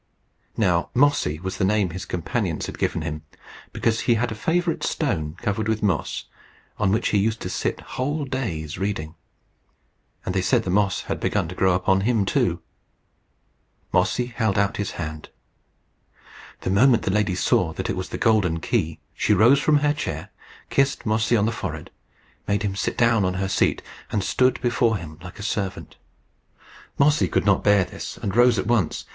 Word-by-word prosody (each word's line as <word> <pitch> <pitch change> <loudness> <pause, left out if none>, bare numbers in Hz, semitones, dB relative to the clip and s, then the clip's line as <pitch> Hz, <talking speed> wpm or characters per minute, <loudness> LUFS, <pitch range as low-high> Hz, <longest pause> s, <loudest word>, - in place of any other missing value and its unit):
Now 90 -6 +2
Mossy 130 - +2
was 95 +2 -5
the - - -1
name 100 -2 +2
his 90 +2 -6
companions 85 -3 -2
had - - -8
given - - -1
him, 75 -1 -4 0.5
because 115 -1 0
he 120 - +2
had 120 +1 -1
a - - -2
favourite 165 +9 0
stone 80 - -1
covered 105 -1 -1
with 110 -1 -1
moss, 95 -4 -1 0.5
on 95 -2 +2
which 110 +3 +1
he 105 - +2
used 110 +2 0
to - - -4
sit - - -2
whole 145 +3 -3
days 90 - -4
reading; 95 -6 -3 1.1
and 90 - -2
they 95 - +1
said 115 +5 +2
the 90 - -2
moss 100 0 +2
had - - -4
begun - - 0
to - - -6
grow 95 0 +2
upon 95 +2 +2
him 110 -1 +1
too. 85 -3 0 1.3
Mossy 125 - +2
held 115 -4 -1
out 100 0 +1
his 100 -2 -3
hand. 80 -2 -6 1.3
The 95 - -2
moment 120 +4 +4
the - - 0
lady 100 -2 +1
saw 90 -2 +2
that - - -4
it - - -1
was - - -4
the - - -4
golden 95 -7 +2
key, 80 0 -1
she 105 - +2
rose 120 +8 +6
from 150 +1 +3
her 145 - +3
chair, 150 - -5 0.4
kissed 135 0 +1
Mossy 110 +2 +2
on 105 - +2
the 115 - +1
forehead, - - -6 0.6
made 100 0 0
him 100 -2 -1
sit - - -2
down 115 -3 +3
on 90 0 0
her 95 +1 -1
seat, 95 - +1 0.3
and 105 - 0
stood 130 +5 +2
before 120 -2 +2
him 80 -3 -10
like 90 0 -10
a - - -7
servant. 100 -3 -3 1.0
Mossy 150 +2 +4
could - - 0
not 100 -2 +3
bear 100 -2 +4
this, 90 - -8
and 95 - -4
rose 120 -1 +5
at 95 - -1
once. 110 -9 0
105 Hz, 185 wpm, -23 LUFS, 90-120 Hz, 1.3 s, rose